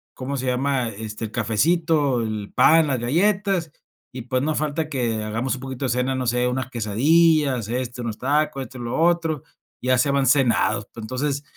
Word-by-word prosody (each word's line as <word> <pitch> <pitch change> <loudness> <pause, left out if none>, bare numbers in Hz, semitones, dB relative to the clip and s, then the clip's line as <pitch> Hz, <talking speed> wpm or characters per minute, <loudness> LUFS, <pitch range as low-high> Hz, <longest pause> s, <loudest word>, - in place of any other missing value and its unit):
¿cómo 135 +2 -4
se 130 - -3
llama?, 130 -1 0
este, 110 +1 -6
el 110 - -8
cafecito, 145 +3 +1
el 110 -2 -4
pan, 160 -1 +5
las 130 -3 0
galletas, 185 - +1 0.4
y 125 -2 -6
pues, 130 +1 -1
no 155 +1 0
falta 155 +1 -2
que 115 -6 -1
hagamos 115 +5 -2
un 130 - -10
poquito 135 0 -5
de 130 - -1
cena, 125 +2 0
no 130 -2 -2
sé, 125 +1 +1
unas 130 +1 -2
quesadillas, 135 +3 +2
esto, 125 0 -3
unos 110 -2 -4
tacos, 140 0 0
esto 130 +1 -11
y - - -6
lo 120 +6 -3
otro, 165 -4 +1 0.4
ya 130 0 +2
se 140 +3 +2
van 140 -1 +1
cenados. 115 -6 +2
Entonces, 135 +6 -3
130 Hz, 185 wpm, -23 LUFS, 120-150 Hz, 0.4 s, pan